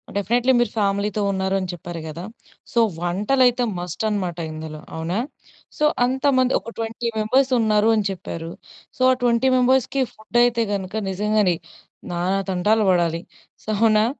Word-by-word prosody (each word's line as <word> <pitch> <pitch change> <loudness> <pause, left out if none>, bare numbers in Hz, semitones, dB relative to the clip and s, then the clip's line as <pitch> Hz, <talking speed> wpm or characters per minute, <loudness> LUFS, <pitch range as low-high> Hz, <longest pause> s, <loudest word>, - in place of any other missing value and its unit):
Definitely 240 +6 +2
మీరు 240 -3 +1
ఫ్యామిలీ‌తో 200 0 0
ఉన్నారని 190 0 -1
చెప్పారు 170 -1 -7
కదా! 160 +3 -7 0.5
సో, 235 - +2 0.2
వంటలైతే 245 +8 +2 0.2
మస్ట్ 180 +3 -5
అనమాట 185 -5 -2
ఇందులో. 155 0 -7 0.2
అవునా? 165 +4 -2 0.6
సో, 300 - +2 0.2
అంతమంది 260 0 +2
ఒక 230 - -9
20 225 +1 -3
మెంబర్స్ 260 +5 +2
ఉన్నారు 215 -1 +3
అని 210 - 0
చెప్పారు. 165 -3 -6 0.5
సో, 255 - -8
ఆ - - +5
20 240 +2 +3
మెంబర్స్‌కి 260 +1 +2
ఫుడ్ 220 +2 -2
అయితే 235 -1 +2
గనుక 190 +1 -4
నిజంగానే 210 -1 +1 0.6
నానా 180 +3 0
తంటాలు 210 +4 +2
పడాలి. 170 -2 +2 0.4
సొ, - - -9
అవునా? 215 0 +4
210 Hz, 140 wpm, -22 LUFS, 180-240 Hz, 0.6 s, ఆ